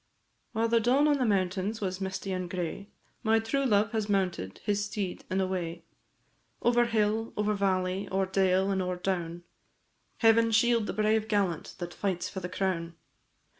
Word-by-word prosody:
While 225 +1 +1
the 230 0 +3
dawn 260 +6 +3
on 290 -2 +3
the 250 - +2
mountain 190 +1 0
was 190 -1 -3
misty 190 0 -3
and 185 -1 -3
gray, 185 +3 -4 0.3
My 225 -1 +3
true 250 +5 0
love 205 -2 +3
has 215 -2 -2
mounted 180 - -1
his 205 0 0
steed 205 -3 -4
and 190 +1 0
away, 175 -3 -2 0.8
Over 240 0 +3
hill, 225 -1 0
over 210 0 +1
valley, 190 -1 0
o'er 190 0 +1
dale, 190 0 +2
and 190 -1 0
o'er 180 0 -1
down; 175 -2 -3 0.7
Heaven 230 0 +5
shield 225 0 +3
the - - -2
brave 215 0 +1
gallant 195 -7 -1
that 175 -1 -6
fights 190 -3 -2
for 190 - -5
the 180 -1 -5
crown! 180 -3 -2
195 Hz, 170 wpm, -29 LUFS, 185-220 Hz, 0.8 s, Heaven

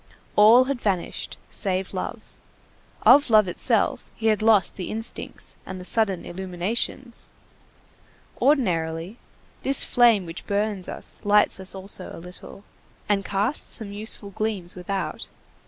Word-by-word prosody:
All 220 +5 +7
had 260 -2 -4
vanished, 190 -5 -3
save 190 -1 -2
love. - - -5 0.8
Of 285 -2 +6
love 215 -3 +5
itself 175 - 0
he 225 - -8
had 215 - -5
lost 215 -4 +3
the 185 - -6
instincts 225 +1 -4
and 185 0 -8
the 180 - -10
sudden 200 -3 0
illuminations. 190 +7 -4 1.1
Ordinarily, 185 - 0 0.4
this 275 0 +6
flame 235 -6 +3
which 165 +1 -9
burns 205 -2 -2
us - - -3
lights 205 -1 +3
us 190 0 -5
also 190 +1 -5
a - - -10
little, 180 +3 -10 0.4
and 200 -1 0
casts 205 +9 +1
some 215 -3 0
useful 205 -1 +4
gleams 200 -4 -2
without. 180 -2 -5
200 Hz, 130 wpm, -23 LUFS, 185-225 Hz, 1.1 s, All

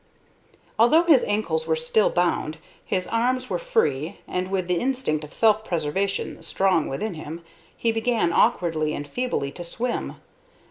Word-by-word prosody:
Although 275 +9 +6
his 310 -7 +5
ankles 165 -7 -1
were 160 - +2
still 160 +7 +2
bound, 170 -3 0 0.3
his 185 -2 -1
arms 250 +4 0
were 180 - 0
free, 150 -2 0
and, 180 0 -2
with 190 -2 -1
the 180 -1 +1
instinct 250 - -1
of 150 - -10
self 215 -1 +3
preservation 180 +2 -2
strong 185 -5 +1
within 195 +10 -3
him, 160 +1 -8 0.3
he 230 - +1
began, 225 -6 +1
awkwardly 165 -9 +2
and 145 - -6
feebly, 245 - -2
to 175 - -8
swim. 235 +8 -3
185 Hz, 150 wpm, -24 LUFS, 160-230 Hz, 0.3 s, Although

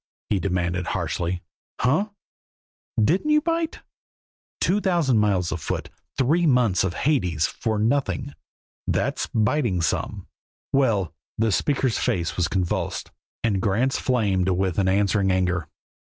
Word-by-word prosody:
he 100 - +3
demanded 90 -1 -1
harshly. 85 +1 -2 0.4
"Hunh! 155 +12 +2 0.9
Didn't 170 - +2
you 300 0 +5
bite? 330 +1 -2 0.8
Two 200 +3 +2
thousand 170 - +2
miles 95 -5 +1
afoot; 80 -2 -3 0.3
three 155 +6 +3
months 125 -8 +3
of 90 -2 -1
Hades; 90 - +1
for 110 +3 -2
nothing. 135 +4 0 0.5
That's - - 0
biting 110 -3 +1
some." - - -2 0.5
"Well!" 115 - +2 0.2
The 110 0 +2
speaker's 130 +1 +1
face 85 -2 0
was 90 -2 +1
convulsed, 90 -1 -2 0.3
and 100 -5 +1
Grant's 115 +7 +1
flamed 100 -7 +1
with 95 -1 0
an 95 - +2
answering 100 +1 +2
anger. 90 -3 +1
105 Hz, 125 wpm, -24 LUFS, 90-135 Hz, 0.9 s, you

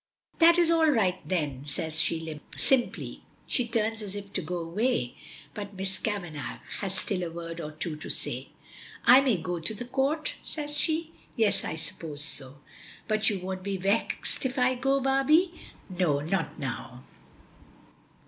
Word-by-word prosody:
"That 335 0 +7
is 340 -1 +5
all 325 -1 +4
right 195 -9 +2
then," 150 -7 -1
says 155 +2 -1
she 160 -2 -1 0.2
simply. 260 -3 +2 0.2
She 250 -4 0
turns 225 -1 0
as 205 -1 -4
if 200 -1 -8
to - - 0
go 180 - -4
away, 170 - -1 0.4
but 205 -1 -7
Miss 190 0 +1
Kavanagh 175 -9 -4 0.2
has 195 -2 -1
still 190 -1 +1
a 175 - -2
word 165 0 -6
or 155 - -6
two 155 +1 -3
to 155 - -7
say. - - +1 0.6
"I 255 +3 +9
may 255 -7 +2
go 175 +1 -3
to 165 +7 0
the 245 - -6
Court?" 275 +5 0
says 295 -1 -2
she. 315 +2 +1 0.2
"Yes; 220 -4 +2
I - - -3
suppose 155 -2 -2
so." 140 -2 +1 0.5
"But 215 0 +3
you 200 -4 -2
won't 185 0 -4
be 195 0 -2
vexed 195 +4 +1
if 260 -1 -2
I 250 0 +3
go, 270 +2 +1
Barbie?" 280 +7 +3 0.3
"No; 175 -6 +1
not 160 -1 -2
now." 130 -2 -6
195 Hz, 165 wpm, -28 LUFS, 165-255 Hz, 0.6 s, I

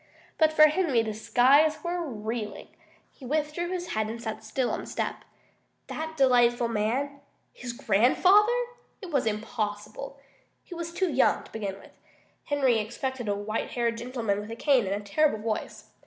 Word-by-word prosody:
But 315 -1 +5
for 310 0 +6
Henry 305 -6 +4
the 220 -1 -3
skies 260 +8 +4
were 350 0 -2
reeling. 220 -5 -5 0.4
He - - -18
withdrew 305 +5 -1
his 360 -1 -4
head 215 0 -1
and 230 +1 -5
sat 220 -1 -5
still 240 +3 -1
on - - -2
the - - -10
step. - - -3 0.6
That 320 0 -6
delightful 240 -3 +4
man 245 +6 -1 0.3
his 245 - -6
grandfather? 260 - +4 0.5
It 375 -5 -9
was 275 -6 +1
impossible. 215 +4 -4 0.4
He - - -10
was 340 -1 -5
too 360 0 0
young, 260 -1 +3
to - - -16
begin 200 -3 -4
with. - - -16 0.5
Henry 270 -6 +2
expected 245 +3 -4
a 200 - +1
white 210 +2 -3
haired 235 -1 0
gentleman 230 -4 -2
with 210 +1 -7
a 230 - -5
cane 255 -4 +3
and 195 - 0
a 205 - -12
terrible 290 +3 +2
voice. 215 0 -4
245 Hz, 170 wpm, -27 LUFS, 220-305 Hz, 0.6 s, for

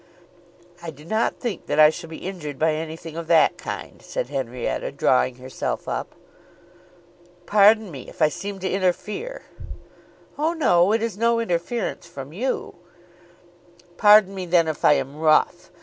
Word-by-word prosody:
"I 170 - -6
do 150 0 -12
not 220 +6 0
think 235 -8 -5
that - - 0
I 155 0 +8
shall 165 0 -9
be 160 - -9
injured 150 -7 -6
by 160 +2 +2
anything 160 +1 -6
of 165 -1 -6
that 165 -2 +4
kind," - - -7
said - - -4
Henrietta, 125 - -3
drawing 65 - +2
herself 130 +1 -5
up. - - -4 1.3
"Pardon 210 0 +4
me 135 -4 -9
if - - -16
I - - +5
seem 195 +7 -6
to 190 - -2
interfere." 210 - -2 1.0
"Oh, 315 +3 +1
no; 190 - +3
it 225 +1 +1
is 220 -3 -4
no 230 0 +2
interference 200 -1 -2
from 140 -3 -9
you." 250 +8 -3 1.2
"Pardon 210 -2 +6
me 185 -2 -5
then 170 -1 +3
if 155 - -4
I - - +7
am 135 +1 -3
rough. 155 -1 +2
170 Hz, 155 wpm, -23 LUFS, 155-210 Hz, 1.3 s, I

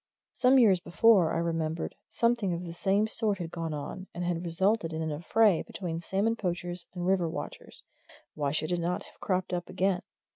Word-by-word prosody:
Some 260 +1 +4
years 205 -8 +6
before, 175 0 +4
I 165 - 0
remembered, 165 -1 -1
something 235 -6 +1
of 170 +1 -4
the 170 - -6
same 200 +4 +2
sort 215 -2 0
had 170 -3 -5
gone 165 -2 -3
on, 155 +6 -5
and 175 - -3
had 175 -1 -1
resulted 175 +1 +1
in 160 - -2
an 160 - -2
affray 180 +5 +3
between 170 -4 -5
salmon 200 +6 0
poachers 175 -3 -3
and 175 -1 -3
river 180 -3 +2
watchers - - -6 0.5
why 145 -2 -1
should 155 +2 -1
it 175 - +1
not 175 +1 -1
have - - -18
cropped 185 -2 -1
up 175 0 -3
again? 185 0 +1
175 Hz, 190 wpm, -29 LUFS, 165-195 Hz, 0.5 s, years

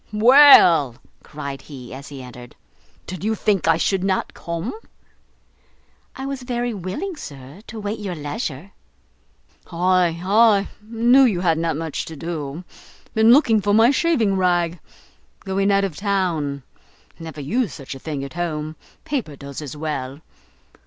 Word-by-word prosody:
"Well," 210 - +7 0.3
cried 140 -2 -7
he, 125 -5 -11
as 140 +2 -9
he 135 -3 -9
entered, 125 -1 -12 0.5
"did 185 0 -7
you 220 +1 0
think 205 -5 0
I 165 -1 +4
should 190 +2 0
not 190 -1 -1
come?" 170 +5 -5 1.4
"I 265 - -6
was 275 -1 -4
very 245 -1 -2
willing, 205 - -5
sir, 140 - -10
to 225 - -8
wait 210 +2 -4
your 195 -4 -4
leisure." 150 - -5 1.0
"Ay, 175 -1 +2
ay, 205 0 +4
knew 235 +4 +3
you 205 -9 +2
had 165 -3 +2
not 165 -2 -1
much 160 -2 -4
to 160 - -8
do. 155 0 -5 0.5
Been 220 +1 +5
looking 235 -5 +5
for 205 +1 +2
my 225 +3 +6
shaving 260 - +1
rag. 175 -2 +1 0.6
Going 195 +1 0
out 200 0 +3
of 190 -6 -3
town; 170 -9 -1 0.6
never 160 -2 -8
use 210 - -1
such 135 +1 -8
a 135 - -10
thing 145 -1 -5
at 140 - -8
home, 155 -2 -4 0.3
paper 235 - -3
does 140 +1 -8
as 150 0 -7
well. 145 -3 -4
175 Hz, 150 wpm, -21 LUFS, 150-215 Hz, 1.4 s, Well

